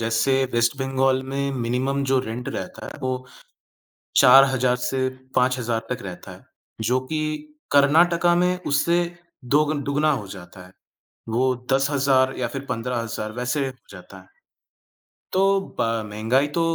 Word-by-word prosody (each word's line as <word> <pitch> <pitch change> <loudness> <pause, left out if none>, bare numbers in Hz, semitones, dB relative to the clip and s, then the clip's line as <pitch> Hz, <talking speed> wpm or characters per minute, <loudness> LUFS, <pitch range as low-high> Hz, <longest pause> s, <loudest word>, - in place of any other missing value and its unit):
जैसे 115 +4 +1
वेस्ट 120 +2 +2
बंगाल 130 0 +1
में 140 0 -1
मिनिमम 130 +2 -1
जो 135 - +4
रेंट 120 +2 -5
रहता - - -6
है, - - -8
वो 130 0 -3 1.0
4,000 130 -1 +6
से 130 +1 0 0.3
5,000 120 -3 0
तक 125 - -3
रहता 90 -3 -8
है, - - -14 0.4
जो 125 +4 +1
कि 155 - 0 0.5
कर्नाटक 165 +5 +4 0.2
में 180 0 0
उससे 170 +5 +2 0.6
दोगन 150 -1 +1
दुगुना 145 +3 +1
हो 115 -8 -3
जाता 90 -1 -11
है, - - -19 0.6
वो 125 +3 +1 0.2
10,000 135 -1 +2
या 125 - 0
फिर 135 +2 -6
15,000, 115 -2 -3
वैसे 125 +4 -1
हो 130 - -5 0.2
जाता 95 0 -12
है। 95 - -17 1.1
तो 185 - +2 0.4
ब - - +3 0.3
महँगाई 115 +7 +1
तो - - +3
130 Hz, 140 wpm, -23 LUFS, 115-140 Hz, 1.1 s, 4,000